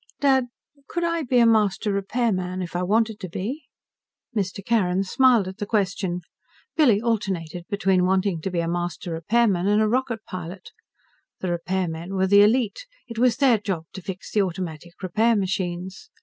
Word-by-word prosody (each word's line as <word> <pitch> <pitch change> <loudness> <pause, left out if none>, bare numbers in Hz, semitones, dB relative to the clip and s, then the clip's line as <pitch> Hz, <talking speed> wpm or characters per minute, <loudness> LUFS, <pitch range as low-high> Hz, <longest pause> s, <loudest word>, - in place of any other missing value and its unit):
"Dad, 265 -3 +3 0.4
could 345 - -2
I 335 -1 0
be 255 -3 +1
a 235 - +6
Master 210 -2 +2
Repairman 195 -3 -1
if 175 0 -8
I 175 - 0
wanted 215 +3 +1
to 185 -4 -6
be?" 245 - -4 0.7
Mr. 200 -1 -2
Carrin 195 -5 +2
smiled 235 0 +4
at 190 +2 -8
the 205 - -2
question. 195 -4 -1 0.5
Billy 250 -10 +5
alternated 190 -7 -2
between 195 -3 +2
wanting 190 -2 +1
to 190 - -2
be 175 -2 -1
a 165 - -2
Master 175 0 -3
Repairman 195 +2 +2
and 210 +1 +3
a 215 - +3
rocket 230 -1 -1
pilot. 180 0 -8 0.7
The 185 - -2
repairmen 175 0 -2
were 190 0 +2
the 200 +1 +6
elite. 235 - +2 0.2
It 230 -1 -6
was 250 0 +3
their 260 -5 +4
job 190 -6 -3
to 190 - -7
fix 185 +1 -7
the 210 - +3
automatic 175 -3 -4
repair 220 +6 +2
machines. 185 -1 -3
195 Hz, 170 wpm, -24 LUFS, 180-225 Hz, 0.7 s, a